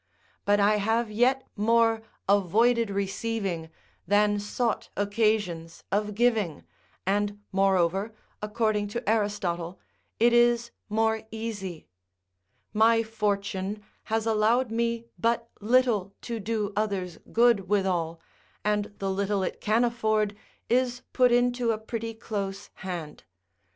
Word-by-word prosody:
But 205 0 +4
I 210 +1 +4
have 225 +2 0
yet 255 +5 +2
more 225 +1 +3 0.3
avoided 220 +4 +3
receiving 195 -3 -2 0.4
than 205 +1 +3
sought 225 +3 -2
occasions 205 -5 0
of 210 +1 0
giving, 220 -8 +1 0.4
and 205 +1 0
moreover, 195 +1 +2 0.3
according 210 -1 0
to 235 +4 -5
Aristotle, 190 -5 -1 0.4
it 235 +1 +5
is 240 0 +4 0.2
more 220 +1 +1
easy., 210 -7 -5 0.9
My 225 +1 +4
fortune 205 -2 -2 0.2
has 225 0 -1
allowed 225 +2 +2
me 235 0 -1
but 230 0 +1
little 215 -4 +2
to 235 -2 -4
do 210 -1 -2
others 195 -5 -2
good 230 -5 +3
withal, 180 -5 0 0.5
and 210 -1 0
the 195 -1 -2
little 200 0 0
it - - -4
can 220 +3 +2
afford, 215 -3 +1 0.3
is 250 0 +1
put 250 -1 +4
into 245 0 +2
a 220 - -1
pretty 225 +1 -5
close 200 -3 -5
hand. 170 -5 -6
215 Hz, 115 wpm, -27 LUFS, 200-230 Hz, 0.9 s, it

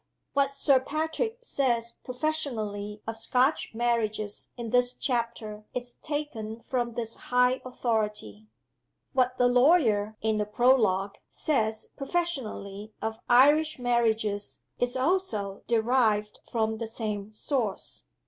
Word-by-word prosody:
What 280 -1 +3
Sir 275 -1 +3
Patrick 320 - -2
says 235 - 0
professionally 225 -7 -3
of 225 0 -4
Scotch 250 +3 +1
Marriages 215 -3 -1
in 235 -2 -5
this 245 0 +3
chapter 235 -4 -2
is 245 -1 -4
taken 235 -8 -4
from 240 -2 -2
this 230 -2 -3
high 250 +1 +3
authority. 210 - -2 0.7
What 255 -1 +2
the 245 - +4
lawyer 245 -5 +4
(in 220 -1 0
the 210 - +1
Prologue) 210 -4 +3
says 220 -7 -1
professionally 260 - -3
of 220 0 -3
Irish 295 +5 +5
Marriages 225 -4 0 0.2
is 245 +1 0
also 255 - 0
derived 220 -3 +2
from 220 -1 0
the 230 - -3
same 215 -2 -4
source. 220 -2 -2
235 Hz, 115 wpm, -28 LUFS, 215-260 Hz, 0.7 s, Irish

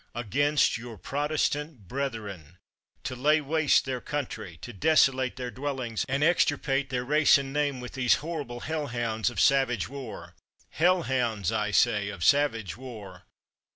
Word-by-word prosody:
against 140 +4 +1
your 120 -2 -9
Protestant 145 - -2
brethren; 105 - -5 0.5
to 130 - -4
lay 150 +5 +3
waste 155 +1 +2
their 130 -2 -3
country, 120 - -5
to 120 - -7
desolate 130 - +3
their 125 -1 -5
dwellings, 130 -5 -3
and 135 +2 0
extirpate 145 -4 +2
their 125 -1 -2
race 150 +2 +5
and 135 -1 -5
name 145 -3 0
with 125 0 -7
these 125 -2 +3
horrible 145 -7 -5
hell 155 -2 -3
hounds 115 -2 -1
of 120 - -6
savage 135 -6 +3
war 135 -4 -8 0.2
— - - -32
hell 180 +2 +2
hounds, 115 - -1
I 105 -1 0
say, 100 0 +2
of 100 -4 -6
savage 140 -8 +2
war! 105 -8 -10
130 Hz, 155 wpm, -27 LUFS, 115-145 Hz, 0.5 s, race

